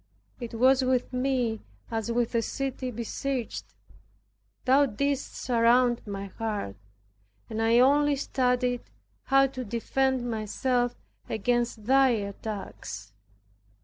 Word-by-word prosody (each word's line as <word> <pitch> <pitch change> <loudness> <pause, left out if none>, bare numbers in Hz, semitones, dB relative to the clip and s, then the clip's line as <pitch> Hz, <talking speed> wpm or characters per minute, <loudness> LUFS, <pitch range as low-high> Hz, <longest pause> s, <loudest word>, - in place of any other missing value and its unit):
It 235 -2 -6
was 260 +3 +5
with 255 -1 0
me 250 -4 0 0.3
as 225 0 -2
with 240 0 0
a 230 - +2
city 265 +1 -3
besieged, 240 +2 -4 0.9
Thou 275 +2 +5
didst 280 +4 -2
surround 240 0 +3
my 200 -1 -4
heart, 205 - -4 0.8
and 220 - -2
I 225 +1 +4
only 285 +3 +5
studied 250 -2 0 0.4
how 270 0 +5
to 265 -1 -4
defend 250 +3 0
myself 245 +2 0 0.3
against 235 +1 0
thy 270 +2 +5
attacks. 200 - -5
245 Hz, 110 wpm, -28 LUFS, 225-265 Hz, 0.9 s, was